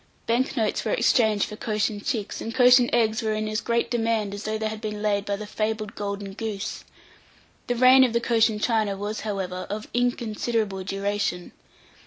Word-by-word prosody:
Bank 245 +4 0
notes 220 -2 0
were - - -1
exchanged 220 - +3
for 210 - -8
Cochin 210 -1 -2
chicks, 215 -2 -3
and 230 - -5
Cochin 250 -1 +6
eggs 225 -2 +2
were 220 -1 -1
in 215 0 -2
as 215 +1 -2
great 235 0 0
demand 225 -4 0
as 205 +1 -7
though 215 0 -1
they 220 0 -2
had 215 0 -6
been 210 -1 -4
laid 200 -1 +1
by 200 - -1
the 210 +1 -7
fabled 215 0 -3
golden 200 -1 -5
goose. 215 0 -5 0.8
The 245 - 0
reign 255 +2 +7
of 250 - +2
the 235 - +1
Cochin 230 -2 +2
China 215 -3 +1
was, 205 +2 -4
however, 190 -4 -4
of 210 +2 -5
inconsiderable 230 -4 -1
duration. 195 -2 -2
215 Hz, 185 wpm, -25 LUFS, 205-230 Hz, 0.8 s, reign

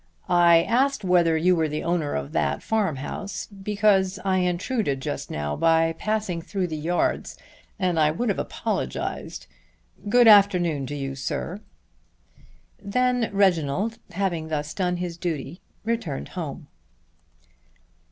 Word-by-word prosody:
I 170 -1 +5
asked 255 +2 +1
whether 175 -3 +3
you 180 +3 +3
were 160 -2 +1
the 150 +1 -3
owner 170 -4 -1
of 70 0 -4
that 70 -2 -1
farm 210 -8 0
house 195 +9 -5
because 200 -1 +1
I 190 -1 +2
intruded 180 - -1
just 70 - -4
now 75 0 -3
by 165 0 +3
passing 210 -1 -2
through 185 +1 -3
the 160 - -3
yards, 165 +4 -1 0.4
and 180 -5 0
I 155 -1 +4
would 220 +10 -1
have 200 - 0
apologized. - - -3 0.6
Good 245 +2 +6
afternoon 180 -9 +5
to 145 - -5
you, 135 -1 -4
sir." 165 +8 -4 1.2
Then 245 +3 +1
Reginald 195 +2 +1
having 170 -4 -2
thus 150 0 -3
done 180 -2 -1
his 175 -1 -4
duty 170 -2 -4 0.2
returned 225 -12 -3
home. 160 -3 -6
175 Hz, 135 wpm, -24 LUFS, 155-200 Hz, 1.2 s, Good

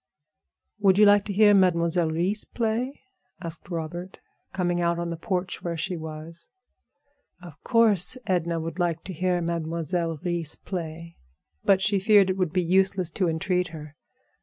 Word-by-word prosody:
"Would 195 -2 +4
you 210 - +7
like 205 0 +5
to 205 - -3
hear 205 +1 +6
Mademoiselle 170 -3 +3
Reisz 180 +7 0
play?" 235 +4 -1 0.4
asked 170 -1 -5
Robert, 175 +2 -5 0.3
coming 175 -2 -1
out 170 0 +1
on 170 0 -3
the 170 - -3
porch 185 +2 -3
where 170 -1 -3
she 180 +3 -3
was. 160 +1 -8 0.9
Of 175 -1 -13
course 230 -2 +3
Edna 170 -2 0
would 165 +2 -5
like 170 -2 -1
to 190 - -7
hear 180 +1 0
Mademoiselle 165 0 -2
Reisz 170 -3 -2
play; 165 -2 -7 0.5
but 195 -1 +3
she 200 -1 +2
feared 200 -1 +5
it 185 - -3
would 180 -4 0
be 180 -1 +1
useless 185 0 +1
to 185 -1 0
entreat 180 +2 0
her. 155 -3 -10
175 Hz, 160 wpm, -25 LUFS, 165-190 Hz, 0.9 s, you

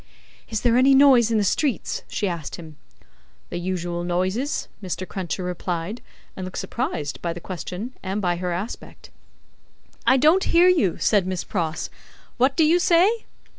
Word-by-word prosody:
"Is 220 -2 -2
there 240 -1 +3
any 270 +2 +6
noise 265 -5 +6
in 225 - +2
the 210 - +2
streets?" 260 +7 0
she 205 - -2
asked 170 -5 -4
him. 160 -3 -11 0.8
"The - - -3
usual 175 -1 -3
noises," 185 +10 -1
Mr. 185 -1 -4
Cruncher 185 0 -4
replied; 180 +3 -4 0.3
and 190 - -6
looked 185 0 -6
surprised 155 - -3
by 170 -1 -2
the 175 - -8
question 185 +7 -6
and 195 +2 -3
by 175 -3 0
her 180 0 -3
aspect. 185 +7 -6 1.0
"I 260 - +6
don't 315 +8 +4
hear 345 +2 +5
you," 275 - +3
said 200 -4 +2
Miss 185 -2 -2
Pross. 165 -4 -3 0.5
"What 265 +2 +2
do 325 - +5
you 335 +3 +4
say?" 370 +6 +3
195 Hz, 165 wpm, -23 LUFS, 175-260 Hz, 1.0 s, any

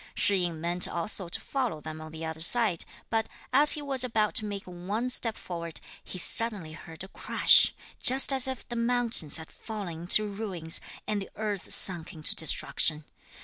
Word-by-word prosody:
Shih 200 - +6
yin 175 -3 -3
meant 175 +2 +4
also 175 +1 -1
to - - -4
follow 250 - -4
them 155 +1 -9
on 155 0 -10
the 160 +1 -8
other 160 0 -7
side, 210 -1 +2 0.3
but, 225 -1 -1 0.2
as 290 +3 +7
he 300 - -5
was 270 -3 +1
about 220 -4 -1
to 215 - +1
make 200 -1 -5
one 195 +8 -4
step 230 -3 +1
forward, 170 -2 -7 0.2
he - - -9
suddenly 200 -3 +3
heard 160 +2 -10
a - - -10
crash, - - +4 0.3
just 265 +2 +4
as 265 0 +5
if 260 -2 -6
the 240 - -7
mountains 235 -9 +1
had 160 0 -10
fallen 195 -7 -8
into 195 +5 +3
ruins, 195 -6 -1 0.2
and 210 -1 -3
the 195 - -9
earth 210 -3 -4
sunk 175 -4 -1
into 155 -1 +1
destruction. 155 0 -1
195 Hz, 185 wpm, -27 LUFS, 165-230 Hz, 0.3 s, as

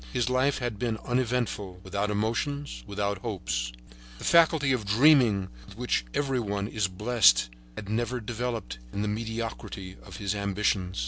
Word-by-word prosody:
His 125 -1 0
life 130 +2 +2
had 120 -5 -3
been 115 -2 -1
uneventful, 120 -7 -1
without 100 +2 -1
emotions, 115 - -2
without 100 -1 -2
hopes. 80 - -2 0.5
The - - -10
faculty 160 -4 +5
of 125 -4 +1
dreaming 110 -3 +5 0.2
with - - -13
which - - 0
every 135 -3 +1
one 100 -3 -2
is 105 -2 0
blessed 95 - +4 0.2
had 100 - -7
never 120 +4 -1
developed 115 - -4
in 100 - -2
the - - -1
mediocrity 110 -3 -4
of - - -10
his 100 -1 -1
ambitions. 100 -2 0
110 Hz, 150 wpm, -28 LUFS, 100-125 Hz, 0.5 s, faculty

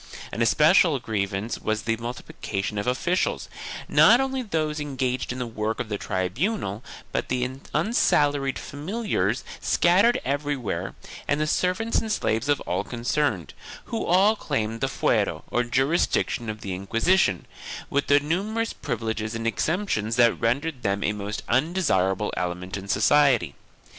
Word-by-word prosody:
An 115 - -3
especial 155 - +5
grievance 105 -2 -2
was 110 0 -2
the 115 0 0
multiplication 105 -4 -4
of 100 - -4
officials 170 +9 0 0.2
— - - -8
not 240 - +6
only 265 -1 -1
those 155 -8 -2
engaged 130 -4 -2
in 125 - -5
the 125 - -2
work 110 -1 -3
of 115 - -3
the 105 - -2
tribunal 105 - -2 0.3
but - - -2
the 125 -1 0 0.2
unsalaried 145 - +2
familiars 145 - -2 0.2
scattered 200 +8 +4
everywhere 135 - -2 0.3
and 145 - +1
the 155 - +1
ser 180 +4 +1
vants 225 +4 0
and 220 - -4
slaves 115 - 0
of 145 - +3
all 90 - -2
concerned, 125 +5 -1 0.4
who 225 - -1
all 195 +5 +4
claimed 115 - -2
the 135 - +2
fuero, 130 - 0
or 120 - +2
jurisdiction 130 -2 +1
of 110 0 -5
the 95 - -4
Inquisition, 115 - +1 0.5
with 140 0 0
numerous 185 +11 +1
privileges 110 -1 -3
and 115 0 -4
exemptions 115 - 0
that 120 -1 +5
rendered 130 +4 0
them 100 -1 0
a 105 - +1
most 105 +1 -5
undesirable 120 - +1
element 90 +1 -3
in 100 0 -6
society. 110 - +3
125 Hz, 145 wpm, -25 LUFS, 110-160 Hz, 0.5 s, not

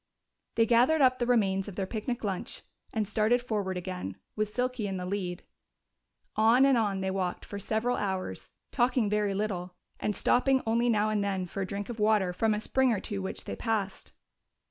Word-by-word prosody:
They 230 - +4
gathered 250 +7 +4
up 255 -1 +4
the 240 - 0
remains 195 -5 +2
of 200 - -7
their 195 - -1
picnic 230 +4 -4
lunch 195 -3 -4 0.3
and 215 -2 -1
started 220 +3 +2
forward 205 -6 -2
again, 180 - -5 0.2
with 215 -1 -1
Silky 250 -2 -1
in 190 -1 -3
the 180 - -4
lead. 180 -2 -3 0.9
On 230 +5 +5
and 275 -1 +5
on 205 -4 +1
they 190 0 -1
walked 185 -2 -2
for 200 - -6
several 220 +4 0
hours, 190 -2 -3 0.2
talking 245 -4 +2
very 210 -2 +1
little, 185 -3 -3 0.2
and 210 - -1
stopping 265 +1 +3
only 235 +2 +2
now 215 -1 +2
and 210 -1 +1
then 190 -2 -1
for 195 +3 -5
a 190 - -2
drink 200 0 -4
of 235 -2 -6
water 210 -4 +3
from 220 +3 +1
a - - -2
spring 260 +3 +2
or 215 - +1
two 200 -1 -4
which 190 - -4
they - - -4
passed. 215 -4 -2
210 Hz, 195 wpm, -29 LUFS, 195-235 Hz, 0.9 s, On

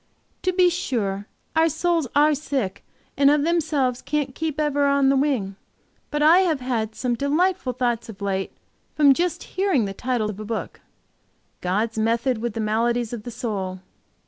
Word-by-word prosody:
To 370 - +1
be 360 -1 +4
sure, 210 - -2 0.3
our 325 +1 +4
souls 335 -1 0
are 300 +1 +5
sick, 270 -9 -3 0.3
and 280 0 +5
of 295 0 +3
themselves 295 -7 0
can't 285 -2 -2
keep 315 0 -3
'ever 290 -1 +2
on 280 -1 +3
the 275 - +4
wing,' 255 -9 0 0.5
but 295 -1 0
I 325 +4 +7
have 340 -7 +2
had 230 -4 -2
some 250 -2 -1
delightful 290 +2 0
thoughts 240 -2 -1
of 205 - -9
late 195 -1 -2 0.4
from 285 -2 +6
just 350 +4 -1
hearing 375 - 0
the 195 - -4
title 235 -1 -1
of 205 - -10
a - - -5
book, 220 +1 -5 0.8
'God's 215 +5 -1
method 230 +2 +1
with 235 -1 -3
the - - -3
maladies 230 +2 0
of 235 - -4
the - - -4
soul.' 195 -6 -4
260 Hz, 170 wpm, -23 LUFS, 220-300 Hz, 0.8 s, I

